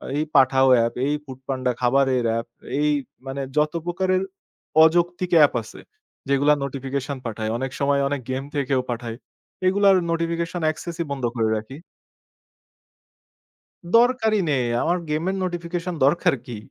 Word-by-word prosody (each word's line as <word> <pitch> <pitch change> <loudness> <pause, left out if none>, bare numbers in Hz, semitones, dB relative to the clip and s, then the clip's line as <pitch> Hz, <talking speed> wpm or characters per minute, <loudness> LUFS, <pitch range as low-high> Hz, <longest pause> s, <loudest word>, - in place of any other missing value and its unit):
এই 150 - +1
Pathao 135 -1 +5 0.2
up, 115 - -3
এই 145 - +1
foodpanda 130 -1 -3
খাবারের 130 0 +2
অ্যাপ, 115 +1 -2 0.3
এই 150 - +2 0.4
মানে 135 +1 -4 0.2
যত 150 +1 +2
প্রকারের 185 +1 0 0.6
অযৌক্তিক 175 +2 +2
অ্যাপ 150 -2 +6
আছে 110 - -12 0.5
যেইগুলা 140 +2 +4
নোটিফিকেশন 135 0 -4
পাঠায়। 110 -1 -3
অনেক 130 +1 -3
সময় 140 0 +2
অনেক 140 -1 -2
গেম 130 +1 -2
থেকেও 135 -2 +1
পাঠায়। 115 -1 -4 0.5
এগুলার 195 0 +5 0.2
নোটিফিকেশন 170 +1 -2
access 170 +2 -7
ই 170 - -1
বন্ধ 135 -2 -4
করে 110 -2 +1
রাখি। 110 +6 -8 2.2
দরকারই 230 -3 +3
নেই। 130 -4 +1 0.2
আমার 175 +2 +1
গেমের 165 +6 -1
নোটিফিকেশন 175 0 -3
দরকার 170 +3 +3
কী? 120 -4 -7
140 Hz, 135 wpm, -23 LUFS, 130-170 Hz, 2.2 s, অ্যাপ